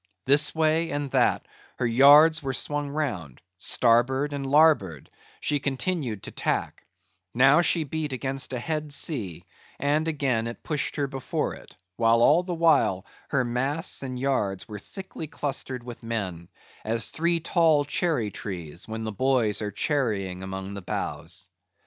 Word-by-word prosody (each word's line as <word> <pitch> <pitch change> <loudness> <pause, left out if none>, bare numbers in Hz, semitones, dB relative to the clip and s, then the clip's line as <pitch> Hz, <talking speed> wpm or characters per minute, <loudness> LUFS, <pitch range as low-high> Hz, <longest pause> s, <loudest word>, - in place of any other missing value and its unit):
This 145 +4 +4
way 160 +1 +2
and 145 -1 -3
that - - +2 0.3
her 125 - -1
yards 145 +7 +6
were 135 -2 -3
swung 145 +2 -2
round; 120 - -4 0.2
starboard 125 +7 +2
and 140 -1 -3
larboard, 135 - +3 0.3
she 145 - 0
continued 135 - -2
to - - -6
tack; - - -2 0.5
now 135 +6 +6
she 165 -1 +2
beat 155 0 -4
against 130 0 -3
a 130 - -2
head 150 +3 -3
sea; 125 - -2 0.3
and 150 +3 0
again 135 -7 0
it 115 - -8
pushed 150 -3 -2
her 145 - 0
before 135 -2 -3
it; - - -14 0.2
while 115 0 +4
all 160 +7 +5
the 180 -1 -4
while, 160 - +3 0.2
her 140 -3 +1
masts 135 +8 -1
and 130 -2 -5
yards 105 -8 -1
were 105 -1 -7
thickly 190 - -8
clustered 135 -4 -4
with 120 -1 -9
men, 95 -7 -4 0.3
as 115 +1 -1
three 170 +1 +1
tall 160 -3 +3
cherry 140 -8 0
trees, 85 -5 -7
when 110 0 -5
the 110 - -3
boys 120 -2 +1
are 105 - -2
cherrying 100 -8 -1
among 95 +1 -6
the 100 - -6
boughs. 90 +2 -4
135 Hz, 155 wpm, -26 LUFS, 110-150 Hz, 0.5 s, yards